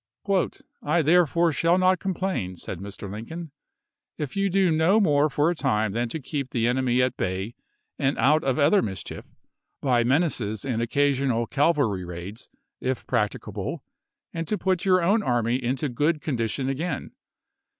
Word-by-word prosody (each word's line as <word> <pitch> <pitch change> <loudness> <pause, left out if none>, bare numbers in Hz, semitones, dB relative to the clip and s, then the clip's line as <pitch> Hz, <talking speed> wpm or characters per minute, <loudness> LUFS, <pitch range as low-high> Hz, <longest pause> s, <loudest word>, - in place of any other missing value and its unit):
" - - -18 0.3
I 160 +3 +1
therefore 170 +1 +4
shall 170 +4 +2
not 185 -1 +3
complain," 185 - -2
said 90 0 -6
Mr. 100 +1 -7
Lincoln, 140 - -7 0.3
" - - -58 0.3
if 145 -3 -5
you 195 0 +1
do 190 -1 +3
no 160 +7 +4
more 150 -6 +3
for 150 +4 +2
a - - -2
time 110 -8 0
than 120 +3 -1
to 160 - -4
keep 140 -1 -4
the 115 -2 0
enemy 125 0 +2
at 125 0 0
bay 95 +4 -2 0.5
and 135 0 +1
out 150 +3 +3
of 135 -2 0
other 175 +7 +4
mischief, 95 -4 -6 0.5
by 125 -4 +2
menaces 125 - 0
and 120 -4 -1
occa 140 +5 +2
sional 125 -4 0
cavalry 140 - +1
raids, 90 +5 -8 0.3
if 130 0 -2
practicable, 105 -5 -2 0.5
and 165 -1 -4
to 210 - 0
put 185 -2 0
your 185 -2 +4
own 205 +6 +3
army 120 - 0
into 130 +4 -1
good 150 +5 0
condition 130 -2 -2
again. 145 +3 -3
135 Hz, 165 wpm, -25 LUFS, 115-165 Hz, 0.5 s, therefore